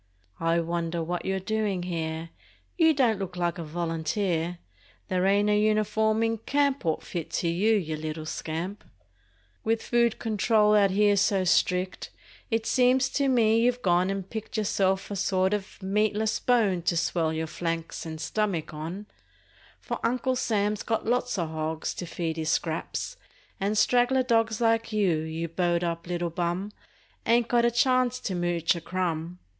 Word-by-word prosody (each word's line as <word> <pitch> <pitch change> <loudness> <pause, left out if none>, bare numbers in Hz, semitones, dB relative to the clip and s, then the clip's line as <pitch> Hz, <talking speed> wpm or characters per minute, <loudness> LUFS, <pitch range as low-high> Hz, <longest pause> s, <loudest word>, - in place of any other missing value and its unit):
I 165 +1 +2
wonder 170 0 -2
what 175 +2 -3
you're 190 0 0
doin' 205 -2 -1
here? 165 -2 -4 0.4
You 325 -2 +5
don't 245 -8 +2
look 185 -2 -5
like 175 0 -1
a - - -3
volunteer! 165 +2 -2 0.5
There 185 0 +1
ain't 200 +1 +3
a - - +4
uniform 215 +1 +2
in 225 -1 0
camp 280 +3 +1
'Ould 160 -2 -1
fit 170 -3 -5
to 170 - 0
you, 200 +7 +2
you 160 -6 -1
little 155 0 -5
scamp 165 +6 -4
f - - -26 0.7
With 225 0 0
food 235 -1 +2
control 215 -1 +2
out 205 -2 +5
here 205 +1 +3
so 195 -1 +2
strict 180 +1 +1 0.4
It 225 -2 0
seems 255 +2 +3
to 280 +1 0
me 230 -4 +4
you've 245 +1 +1
gone 180 0 +3
and 195 -1 -3
picked 220 +1 -6
Yourself 195 -2 0
a - - -2
sort 190 0 +1
o' 210 - +1 0.2
meatless 210 +2 +1
bone 215 -8 +2
To 170 0 0
swell 165 -1 0
your 160 0 -2
flanks 165 0 -4
and 160 -1 -6
stummick 185 -4 -2
on, 165 +7 -6 0.7
For - - -5
Uncle 255 +2 +1
Sam's 210 -3 0
got 225 -1 -1
lots 245 -1 0
o 175 - +1
r - - -4
hogs 160 0 -3
To 175 - -6
feed 165 -1 -3
his 160 -1 -2
scraps, 165 - -2 0.4
and 205 +2 0
straggler 245 +3 +3
dogs 225 -2 +1
Like 225 -1 +2
you, 200 -6 +2
you 160 +1 -4
bowed 175 +1 0
up 170 0 -3
little 175 -1 -2
hum, 180 +4 -2 0.6
Ain't 235 0 +4
got 240 -1 +3
a - - +5
chance 250 +1 +2
to 195 - -3
mooch 175 -1 +1
a 170 - -5
crumb! 175 -1 -3
195 Hz, 170 wpm, -27 LUFS, 170-225 Hz, 0.7 s, You